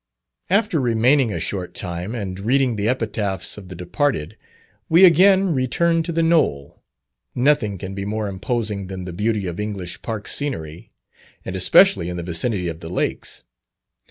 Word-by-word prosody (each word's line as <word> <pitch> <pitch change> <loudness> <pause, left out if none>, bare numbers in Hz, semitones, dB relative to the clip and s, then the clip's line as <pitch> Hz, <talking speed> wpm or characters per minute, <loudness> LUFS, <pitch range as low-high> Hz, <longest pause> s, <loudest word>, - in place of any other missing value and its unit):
After 200 -3 +2
remaining 120 +1 +3
a - - -3
short 90 -3 -4
time, 90 +4 -5
and 95 -4 -5
reading 125 +3 +1
the 105 +1 0
epitaphs 105 -6 -1
of 95 -3 -11
the 90 - -8
departed, 90 - -2 0.5
we 170 +4 +7
again 190 +1 +5
returned 165 +6 +1
to 170 - -3
"The 165 0 +1
Knoll." 110 - +1 0.5
Nothing 125 -6 +2
can 95 +2 -7
be 100 0 -4
more 105 +1 -2
imposing 105 0 -3
than 95 -1 -6
the 90 - -6
beauty 105 +2 -1
of 85 0 -5
English 95 -5 -5
park 110 -3 -5
scenery, 85 - -4 0.5
and - - -5
especially 85 - +4
in 90 - -5
the 85 - -4
vicinity 90 +3 -2
of 80 -1 -5
the 80 - -8
lakes. 90 - -3
105 Hz, 160 wpm, -21 LUFS, 90-135 Hz, 0.5 s, we